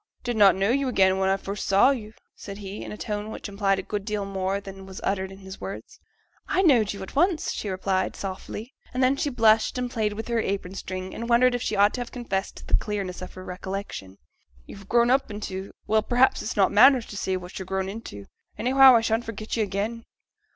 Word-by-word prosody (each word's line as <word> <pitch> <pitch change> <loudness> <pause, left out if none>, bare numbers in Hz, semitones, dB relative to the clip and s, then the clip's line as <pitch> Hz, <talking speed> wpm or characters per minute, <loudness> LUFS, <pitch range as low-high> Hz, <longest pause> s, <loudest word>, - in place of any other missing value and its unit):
'I 420 - -47
did 240 -2 -2
not 195 -4 +7
know 195 +3 +1
you 275 +1 +1
again 190 -5 +3
when 190 0 +2
I 195 - +2
first 195 +1 -5
saw 195 +7 +5
you,' 220 -5 -5 0.2
said 200 -1 -9
he, 200 0 -7
in - - -7
a 210 - -7
tone 210 -1 -4
which 220 - -6
implied 200 -1 +1
a 190 - -4
good 205 0 -4
deal 205 0 -2
more 195 0 -2
than 195 -1 -10
was 190 0 -8
uttered 190 -1 -1
in 190 0 -12
words. 195 - -8 0.5
'I 375 - +1
knowed 240 - +4
yo' 200 -1 -6
at 190 - -10
once,' 340 +2 +2
she 210 - -4
replied, 190 0 -1
softly, 205 +5 -6 0.2
and 255 - +2
then 260 +2 +4
she 290 - -1
blushed 225 -2 +3
and 250 -1 -2
played 215 -4 0
with 220 +1 -6
her 235 -1 0
apron 195 -2 -3
string, 185 -1 -6
and 235 +1 -5
wondered 245 +1 +5
if 245 - -2
she 215 - -1
ought 205 +1 +4
to 250 - -3
have 240 - -6
confessed 200 -6 -3
to - - -11
the - - -9
clearness 195 -4 -4
of 185 - -8
her 185 0 -9
recollection. 180 - -6 0.5
'You're 195 0 -11
grown 235 +3 +3
up 270 -1 +2
into 200 -2 -6
well, 220 0 +3
perhaps 250 +4 +3
it's 215 - -5
not 195 - +4
manners 245 +3 +6
to - - -10
say 190 -1 -1
what 180 +1 -8
you're 190 - -7
grown 190 0 -2
into 195 - -8 0.3
anyhow, 260 +3 +7
I 230 - +5
shan't 225 +1 0
forget 220 -1 -5
yo' 230 - 0
again.' 215 +3 -2
205 Hz, 235 wpm, -25 LUFS, 195-235 Hz, 0.5 s, not